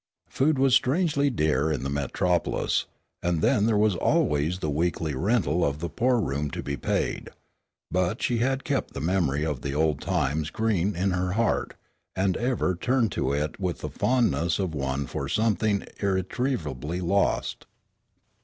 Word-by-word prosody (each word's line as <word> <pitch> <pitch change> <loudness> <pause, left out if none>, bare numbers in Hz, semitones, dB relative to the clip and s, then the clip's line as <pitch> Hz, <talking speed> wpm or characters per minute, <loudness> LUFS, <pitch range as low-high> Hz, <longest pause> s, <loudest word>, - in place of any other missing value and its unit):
Food 145 +2 +2
was 135 -1 +3
strangely 145 +1 +3
dear 75 - +1
in 70 -4 -2
the 70 - -2
Metropolis, 80 +5 0 0.3
and 85 -1 0
then 105 +1 +3
there 110 -2 +2
was 105 -2 +3
always 75 +1 +1
the 85 - -3
weekly 80 0 -1
rental 90 - +1
of 70 0 0
the 85 +2 -4
poor 125 - +2
room 75 -7 -1
to - - -4
be 70 - -3
paid. - - -2 0.6
But 90 -1 0
she 120 -2 +1
had 135 +3 0
kept 145 -5 -2
the - - -3
memory 80 -3 +1
of 75 -5 -3
the 70 0 -3
old 75 -1 +1
times 75 +2 0
green 105 -3 0
in 95 +3 0
her 90 0 -1
heart, 115 +1 0 0.4
and 95 -1 +1
ever 120 -6 0
turned 115 +4 +1
to 65 - -1
it 75 +5 -2
with 90 -3 -2
the - - -4
fondness 115 -9 +1
of 95 -5 -2
one 70 -1 -2
for 60 - -4
something 105 -2 +1
irretrievably 95 - -2
lost. 100 +3 0
90 Hz, 165 wpm, -26 LUFS, 75-110 Hz, 0.6 s, was